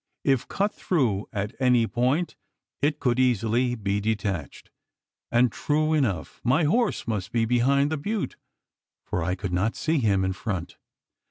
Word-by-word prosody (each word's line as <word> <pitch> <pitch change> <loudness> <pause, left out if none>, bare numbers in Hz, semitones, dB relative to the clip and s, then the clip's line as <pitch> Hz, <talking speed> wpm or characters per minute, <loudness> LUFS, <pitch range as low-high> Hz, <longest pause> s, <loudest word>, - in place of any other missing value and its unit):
If 135 -4 +1
cut 205 +1 0
through 120 - 0
at 105 +1 -3
any 125 -3 +4
point, 130 +9 0 0.5
it 150 +1 +1
could 125 -1 +1
easily 120 0 +2
be 100 -2 -1
detached; 100 - -3 0.6
and, 120 +1 +4
true 155 +1 0
enough, 115 - -1
my 135 +8 +3
horse 220 - +1
must 105 -5 -2
be 115 -1 +2
behind 135 +5 +2
the 160 - 0
butte, 205 +7 -3 0.7
for 90 - -2
I 90 +2 0
could 95 -1 -4
not 100 +6 +1
see 160 -1 0
him 100 -5 +2
in 95 - 0
front. 95 -3 -4
120 Hz, 155 wpm, -26 LUFS, 100-145 Hz, 0.7 s, any